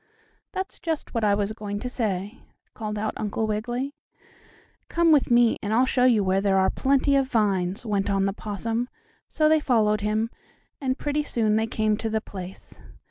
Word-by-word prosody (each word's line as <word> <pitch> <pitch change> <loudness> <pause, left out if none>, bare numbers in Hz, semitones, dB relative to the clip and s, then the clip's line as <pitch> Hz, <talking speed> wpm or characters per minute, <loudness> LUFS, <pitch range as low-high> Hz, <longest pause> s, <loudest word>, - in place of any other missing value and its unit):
"That's 380 0 -5
just 320 -3 -3
what 230 -2 -1
I 205 -1 +4
was 205 +1 -1
going 205 -2 -5
to - - -3
say," 210 -3 -3 0.3
called 215 -2 -4
out 215 +1 -2
Uncle 215 +1 -1
Wiggily. 240 +6 -2 1.0
"Come 335 -1 +3
with 295 -3 +4
me, 240 -1 +4
and 205 - -3
I'll 250 +3 +4
show 255 -1 +2
you 230 -5 +4
where 190 +1 +2
there 195 -1 +2
are 190 0 +3
plenty 275 +1 +2
of 270 -1 +2
vines," 200 -3 0
went 205 -2 0
on 195 -1 +2
the 195 - 0
possum, 225 +4 -3 0.4
so 310 - +2
they 315 0 +5
followed 215 -7 +2
him, 215 +2 0 0.5
and 260 -1 0
pretty 295 0 -1
soon 225 -7 0
they 220 +1 +1
came 215 -1 0
to 225 - -3
the 220 0 0
place. 190 -3 -10
220 Hz, 190 wpm, -25 LUFS, 205-255 Hz, 1.0 s, they